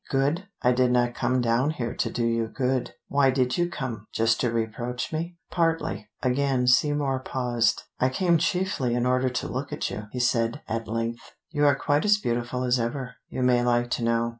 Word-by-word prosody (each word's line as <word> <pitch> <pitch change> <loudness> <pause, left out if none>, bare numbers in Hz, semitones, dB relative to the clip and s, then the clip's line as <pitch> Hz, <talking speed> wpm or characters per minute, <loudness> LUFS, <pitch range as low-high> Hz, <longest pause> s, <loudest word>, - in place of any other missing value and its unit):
Good? 145 +8 0 0.2
I 125 - +5
did 125 0 +3
not 120 -1 +2
come 125 +1 0
down 120 +4 +2
here 120 -7 -3
to - - -1
do 120 - -1
you 115 -1 +1
good." 130 +1 -1
"Why 140 -1 +3
did 130 -1 +1
you 175 0 +2
come? 120 - -5
Just 115 +1 +2
to 120 - +1
reproach 115 +4 -3
me?" 170 +2 -3
"Partly." 160 - 0
Again 130 0 +1
Seymour 135 +1 +3
paused. 120 -4 0 0.2
"I 130 - +3
came 170 +4 +2
chiefly 170 -8 0
in 120 0 +1
order 130 +1 +2
to 125 - -3
look - - -4
at - - -2
you," 105 0 -6
he 125 - -4
said 115 -2 +1
at 115 0 -3
length. 115 +1 -4 0.2
"You 145 -2 +3
are 145 - +5
quite 145 +1 +1
as 210 0 +5
beautiful 120 - -2
as 125 0 +2
ever, 125 +2 -3
you 130 - -2
may 125 -1 +4
like 120 0 +1
to 120 - -1
know." 115 0 +1
125 Hz, 200 wpm, -26 LUFS, 120-140 Hz, 0.2 s, I